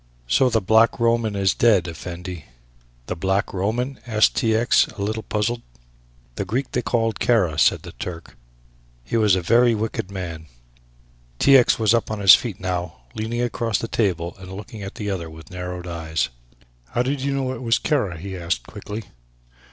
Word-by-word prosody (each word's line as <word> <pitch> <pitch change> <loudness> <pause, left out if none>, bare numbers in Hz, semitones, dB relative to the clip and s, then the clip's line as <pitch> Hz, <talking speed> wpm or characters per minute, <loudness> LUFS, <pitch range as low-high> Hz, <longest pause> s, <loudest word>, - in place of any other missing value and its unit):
"So 95 - +3
the 115 -2 +1
Black 110 +4 +4
Roman 115 -2 +2
is 95 -1 +2
dead, 105 -7 +3
Effendi." 85 0 -7 0.6
"The 90 - -4
Black 95 +4 0
Roman?" 120 +8 -2
asked 110 -2 +3
T. 110 -1 +2
X., 115 +2 +4
a 105 -2 -6
little 110 +2 -2
puzzled. 110 +3 -1 0.8
"The - - -1
Greek 125 +7 -2
they 125 - 0
call 115 -2 0
Kara," 95 -12 +1
said - - +3
the - - -8
Turk; 85 -2 -8 0.7
"he - - -4
was 105 -4 +4
a 95 - -2
very 115 +5 +4
wicked 110 -3 -3
man." 85 -5 -6 0.9
T. 140 - +6
X. 125 -3 +5
was 110 -1 +3
up 115 - +1
on 110 - -3
his 100 -2 +9
feet 120 -8 +2
now, 90 -7 -4
leaning 115 +2 -2
across 115 -3 -1
the 115 - -4
table 90 -5 -1
and 95 0 -10
looking 105 +2 -8
at 100 0 -7
the 105 -2 -3
other 85 -4 -4
with 80 +3 -13
narrowed 90 -1 -6
eyes. 80 -2 -2 0.7
"How 120 - +3
did 135 +1 -2
you 140 0 -1
know 130 -1 -1
it 130 - -7
was 115 -2 +2
Kara?" 105 - 0
he 95 +3 -6
asked 85 -9 -2
quickly. 105 +2 -7
105 Hz, 185 wpm, -22 LUFS, 90-115 Hz, 0.9 s, his